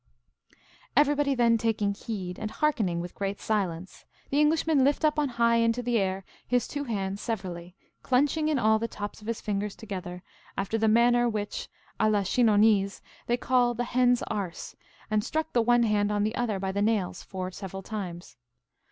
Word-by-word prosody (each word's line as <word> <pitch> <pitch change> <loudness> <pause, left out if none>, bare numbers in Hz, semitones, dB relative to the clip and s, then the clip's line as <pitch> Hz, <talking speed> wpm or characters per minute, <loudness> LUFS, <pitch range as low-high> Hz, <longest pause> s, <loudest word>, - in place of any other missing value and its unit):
Everybody 290 -1 +3
then 235 -2 +3
taking 215 -3 0
heed, 195 -4 -6
and 215 - -3
hearkening 215 - 0
with 175 0 -7
great 200 0 -3
silence, 185 -4 -2 0.3
the 285 - +2
Englishman 300 -1 +3
lift 285 +3 +2
up 300 0 +2
on 290 -2 +1
high 235 0 +4
into 230 +1 +1
the 240 -1 +1
air 190 0 -2 0.2
his 245 -1 +1
two 290 -1 -4
hands 200 -4 -3
severally, 180 -5 -5 0.3
clunching 290 +4 +2
in 305 - +1
all 220 -3 +3
the 230 - -2
tops 205 0 -7
of 210 - -12
his 230 -1 -3
fingers 205 0 -2
together, 185 -4 -7 0.3
after 195 +3 -1
the 220 - +2
manner 240 +2 +4
which, 210 -2 -4 0.3
a 215 - +3
la 205 -2 +2
Chinonnese, 210 -2 +3 0.2
they 240 - +2
call 245 -1 +2
the 245 - -1
hen's 245 0 +2
arse, 195 -5 -5 0.4
and 215 -1 +2
struck 315 +5 -2
the 240 - +4
one 240 +1 +4
hand 210 -2 +1
on 205 0 +1
the 215 +1 0
other 235 -4 -1
by 190 0 -2
the 200 +1 -1
nails 210 -4 0
four 185 -1 -5
several 195 0 -7
times. 180 - -6
220 Hz, 180 wpm, -27 LUFS, 195-245 Hz, 0.4 s, high